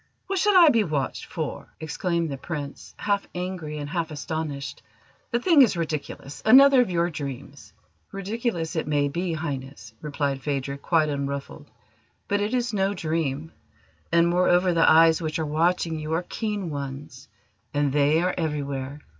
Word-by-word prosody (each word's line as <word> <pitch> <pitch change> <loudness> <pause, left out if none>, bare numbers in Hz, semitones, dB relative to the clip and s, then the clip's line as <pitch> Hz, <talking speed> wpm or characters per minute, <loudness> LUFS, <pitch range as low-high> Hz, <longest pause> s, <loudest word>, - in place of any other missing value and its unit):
What 390 -1 -1
should 415 +1 +3
I 345 -4 +8
be 230 -5 +3
watched 150 -7 -2
for?" - - -5
exclaimed 170 +1 -2
the 135 - -4
Prince, 145 -4 -7
half 200 -1 -1
angry 180 -4 -4
and 145 -1 -5
half 165 +1 -2
astonished. 145 0 -5 0.5
"The 240 - 0
thing 310 +2 +5
is 225 -8 +4
ridiculous; 150 -3 -5
another 265 +3 +8
of 245 - 0
your 175 0 0
dreams!" 140 -1 -7 0.4
"Ridiculous 195 -4 -3
it 160 - -1
may 145 -1 +1
be, 170 +4 -2
Highness," 135 -7 -6
replied 140 -2 -2
Phadrig, 140 -1 -3
quite 160 -3 +2
unruffled, 140 -1 -4 0.6
"but 205 0 0
it 210 +5 0
is 240 -2 -1
no 195 0 +1
dream; 160 -2 -2 0.6
and, 170 0 +4
moreover, 180 +1 +3
the 165 -1 +5
eyes 165 +1 +6
which 155 0 -2
are 160 - -1
watching 165 +1 0
you 155 +1 -4
are 165 +2 0
keen 210 -6 -3
ones 135 -3 -7 0.4
and 145 -2 0
they 150 +3 +3
are 180 - +1
everywhere. 145 -3 -3
160 Hz, 160 wpm, -25 LUFS, 145-180 Hz, 0.6 s, I